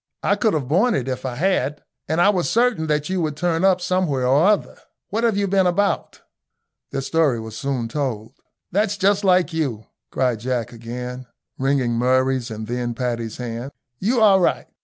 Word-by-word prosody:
I - - +3
couldn't 215 -10 +1
have 130 - -9
borne 200 - +3
it 130 -2 -2
if 130 0 -3
I 125 - -4
had, 150 -2 0 0.2
and 160 +2 0
I 195 - +5
was 185 -4 +1
certain 235 -9 +2
that 150 -1 0
you 185 -1 -1
would 155 -2 -2
turn 170 0 0
up 190 -1 +4
somewhere 175 -8 0
or 140 +8 +4
other. 210 -1 +1 0.3
What 225 +3 -1
have 225 -4 +2
you 200 0 +1
been 190 -1 +3
about?" 200 +3 0 0.7
Their 135 - -3
story 145 -4 +1
was 110 -1 -8
soon 135 -3 -2
told. 115 -4 -3 0.4
"That's 205 +1 +1
just 200 +1 +2
like 180 -2 +3
you," 135 -9 -2 0.2
cried 125 -4 0
Jack, 120 -1 -2
again, 125 +2 -7 0.3
wringing 135 -3 +1
Murray's 130 +1 +1
and 110 0 -6
then 120 +1 -3
Paddy's 115 -2 -3
hand. 120 +2 -5 0.3
"You 230 +5 +1
are 200 -3 +6
right. 180 - +1
145 Hz, 185 wpm, -22 LUFS, 125-185 Hz, 0.7 s, are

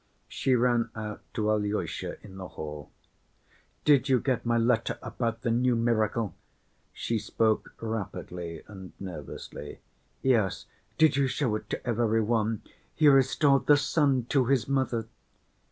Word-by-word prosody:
She 130 - +1
ran 120 -1 +2
out 105 -1 -5
to 110 -1 +1
Alyosha 105 0 -2
in 95 -2 -11
the 95 -1 -6
hall. 75 -2 -7 1.0
"Did 140 -2 +4
you 130 -2 +4
get 130 -2 -1
my 120 0 +3
letter 115 0 +1
about 115 -2 -3
the 115 - +1
new 125 +1 +2
miracle?" 115 -2 +1 0.6
She 115 -1 -2
spoke 110 +1 0
rapidly 90 -6 -5
and 95 -3 -10
nervously. 95 -4 -8 0.4
"Yes." 115 -8 +2 0.3
"Did 155 -3 +5
you 140 -1 +3
show 125 -4 0
it 110 - -6
to - - -4
every 115 -1 +2
one? 110 -1 0 0.3
He 155 - +4
restored 135 +1 +4
the 145 - +7
son 140 -4 +2
to 135 -3 +3
his 130 -2 +2
mother!" 130 -5 0
115 Hz, 140 wpm, -28 LUFS, 105-130 Hz, 1.0 s, the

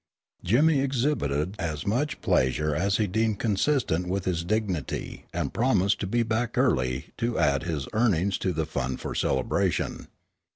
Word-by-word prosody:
Jimmy 145 - +4
exhibited 115 - 0
as 75 -4 -3
much 140 +9 -1
pleasure 75 +4 +1
as 100 +5 +1
he 110 - +2
deemed 110 +2 0
consistent 105 - +1
with 95 +1 -2
his 85 -2 0
dignity 95 -4 -2
and - - -3
promised 100 -5 +2
to 95 - -2
be 120 +4 +1
back 115 +1 -1
early 65 - +1
to 115 0 -1
add 70 -1 +2
his 80 -6 -3
earnings 100 -4 +2
to 95 - 0
the 80 -2 -1
fund 65 -4 -3
for - - -5
celebration. 65 -1 0
100 Hz, 155 wpm, -26 LUFS, 80-115 Hz, -, Jimmy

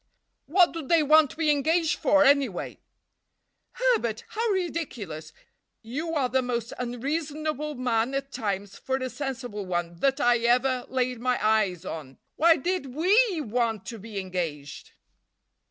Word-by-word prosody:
"What 350 +3 +4
do 330 - -5
they 315 +2 +3
want 305 0 +5
to - - -12
be 320 -2 +3
engaged 315 +3 +1
for, 290 -1 +4
anyway?" 275 -9 +1 0.9
"Herbert! 470 - 0
How 455 +1 -1
ridiculous! 320 - -3 0.5
You 305 +9 -4
are 275 -4 +2
the 260 +1 +1
most 240 -2 -3
unreasonable 300 +4 -3
man 245 0 0
at 275 0 -3
times 200 -3 -4
for 265 - -2
a 260 -1 -3
sensible 245 -6 -5
one 175 -1 -2
that 270 +5 +1
I 240 -3 +4
ever 245 +2 +1
laid 255 -2 -1
my 250 +1 +1
eyes 200 -5 +1
on. 145 -7 -7 0.2
Why 330 +1 +5
did 285 -4 -3
we 380 +2 +3
want 230 -4 -1
to 230 - -7
be 210 0 -6
engaged?" 170 -7 -5
255 Hz, 145 wpm, -26 LUFS, 225-310 Hz, 0.9 s, want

